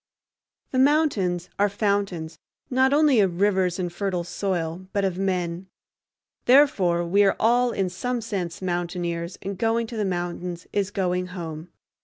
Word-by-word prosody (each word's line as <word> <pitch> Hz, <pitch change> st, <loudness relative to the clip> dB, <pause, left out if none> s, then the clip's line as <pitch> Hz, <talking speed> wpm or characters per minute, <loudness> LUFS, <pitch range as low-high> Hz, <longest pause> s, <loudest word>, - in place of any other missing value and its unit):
The 255 Hz, -, +1 dB
mountains 255 Hz, -, +2 dB
are 205 Hz, 0 st, +4 dB
fountains 200 Hz, -6 st, -1 dB, 0.3 s
not 260 Hz, +1 st, +3 dB
only 290 Hz, -4 st, +4 dB
of 185 Hz, -4 st, +1 dB
rivers 190 Hz, -3 st, +2 dB
and 175 Hz, -2 st, -3 dB
fertile 185 Hz, -2 st, -2 dB
soil, 180 Hz, -1 st, -3 dB
but 200 Hz, -1 st, +1 dB
of 185 Hz, -1 st, -2 dB
men. 180 Hz, -2 st, -2 dB, 0.8 s
Therefore 195 Hz, -11 st, +4 dB
we 200 Hz, +4 st, +4 dB
are 195 Hz, -, +3 dB
all, 245 Hz, +2 st, +3 dB
in 195 Hz, -5 st, -1 dB
some 245 Hz, +7 st, -3 dB
sense, 190 Hz, -6 st, -4 dB
mountaineers, 175 Hz, -1 st, -3 dB
and 195 Hz, -1 st, -5 dB
going 230 Hz, 0 st, +1 dB
to 225 Hz, 0 st, -7 dB
the 215 Hz, -, 0 dB
mountains 175 Hz, -1 st, -3 dB
is 200 Hz, -1 st, 0 dB
going 180 Hz, -3 st, -1 dB
home. 160 Hz, 0 st, -6 dB
190 Hz, 150 wpm, -24 LUFS, 175-210 Hz, 0.8 s, are